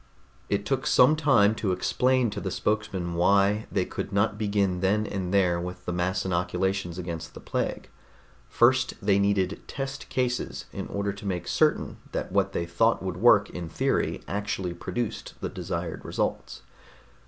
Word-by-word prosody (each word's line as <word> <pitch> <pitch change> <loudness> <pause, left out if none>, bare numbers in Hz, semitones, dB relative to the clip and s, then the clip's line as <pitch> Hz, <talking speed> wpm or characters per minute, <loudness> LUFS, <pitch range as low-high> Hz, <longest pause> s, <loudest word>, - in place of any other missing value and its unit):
It 100 0 0
took 135 -1 -1
some 135 +5 +6
time 135 -9 +4
to 105 -3 -1
explain 125 +5 +2
to 100 0 -5
the 95 - -2
spokesman 100 -4 -1
why 100 +4 +3
they 95 -2 +1
could - - -5
not 100 +1 +2
begin 100 -3 0
then 100 +3 +2
and 95 -3 -3
there 90 -3 +3
with 90 +1 -7
the 90 - -2
mass 95 +2 -1
inoculations 90 0 -1
against 85 -2 -6
the - - -8
plague. - - -3 0.6
First, 130 +2 +3
they 100 -1 +2
needed 100 -1 +1
test 135 +1 -5
cases, 125 -1 -2
in - - -5
order 100 0 -2
to 100 +1 -11
make 90 -3 -2
certain - - +1 0.2
that - - -3
what - - +2
they 85 - -2
thought 105 +6 +2
would 95 -2 -3
work 105 -1 +5
in 85 -2 -6
theory - - 0
actually 100 -3 -2
produced 120 +5 -4
the - - -3
desired - - -4
results. - - -3
100 Hz, 165 wpm, -27 LUFS, 90-110 Hz, 0.6 s, some